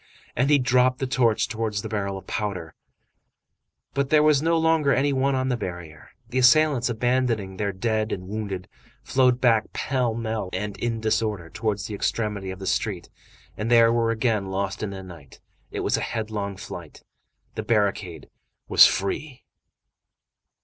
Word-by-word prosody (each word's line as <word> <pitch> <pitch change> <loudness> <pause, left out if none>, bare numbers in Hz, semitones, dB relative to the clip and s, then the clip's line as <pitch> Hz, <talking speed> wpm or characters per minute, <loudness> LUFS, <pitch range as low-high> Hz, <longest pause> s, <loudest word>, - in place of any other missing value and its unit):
And 130 +4 +1
he 145 - +6
dropped 125 0 +3
the 135 - -2
torch 125 -5 +2
towards 110 -3 -3
the - - -4
barrel 100 -3 -3
of 95 - -11
powder. 95 -7 -4 1.2
But 140 0 0
there 150 0 +5
was 150 -2 +4
no 165 +1 +2
longer 160 -3 +3
any 140 +2 +2
one 135 +1 +1
on 130 0 0
the 125 - +1
barrier. 85 -7 -7 0.2
The 130 +2 0
assailants, 130 -1 +4
abandoning 120 -5 0
their 100 0 -1
dead 110 +3 -1
and 90 -1 -4
wounded, 100 -3 -4 0.4
flowed 125 -1 +2
back 115 -4 +2
pell 125 -4 -1
mell 110 -4 -3
and 105 -1 -3
in 115 -1 -2
disorder 105 -6 -1
towards 105 -3 -2
the 105 - -6
extremity 105 -1 -2
of 95 - -6
the 95 - -8
street, 95 -2 -2 0.4
and 110 +2 -3
there 115 -1 +6
were 115 -1 +1
again 110 -3 0
lost 95 +1 -3
in 105 - -2
the 95 -1 -7
night. 85 -7 -13 0.3
It - - -4
was - - +1
a - - -3
headlong 105 -3 -3
flight. 85 -4 -9 0.5
The - - -4
barricade 100 -7 -1 0.4
was - - +8
free. 130 +8 -3
110 Hz, 165 wpm, -24 LUFS, 100-125 Hz, 1.2 s, was